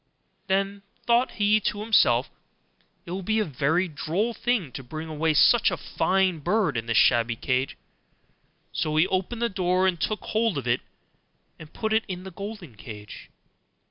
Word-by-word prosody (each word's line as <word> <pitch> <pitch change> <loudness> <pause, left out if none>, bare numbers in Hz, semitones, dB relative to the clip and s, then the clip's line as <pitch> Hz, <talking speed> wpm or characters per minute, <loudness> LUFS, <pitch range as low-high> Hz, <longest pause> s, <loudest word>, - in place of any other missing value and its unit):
Then 195 +1 0 0.2
thought 240 +2 +2
he 210 0 +3
to 205 0 -2
himself, 135 - +3 0.8
'It - - -8
will 190 +2 -3
be 215 +4 0
a 215 - +2
very 155 +6 0
droll 175 +9 -2
thing 225 - -1
to 125 - -7
bring 155 +5 -7
away 160 0 0
such 235 +9 +5
a 180 - -3
fine 185 +3 0
bird 185 - +1
in 115 0 -3
this 115 -1 +1
shabby 115 +1 +4
cage'; 130 +3 -1 0.9
so 155 0 -2
he 160 +2 +5
opened 190 +6 -2
the - - +3
door 185 -2 +1
and 175 -3 0
took 215 - -1
hold 220 -5 0
of 135 - -4
it 120 +1 +1 0.8
and 155 -1 -12
put 220 -1 -2
it 220 +1 +3
into 185 -1 -5
the 190 - -8
golden 195 - -8
cage. 105 -1 -10
180 Hz, 175 wpm, -25 LUFS, 145-210 Hz, 0.9 s, such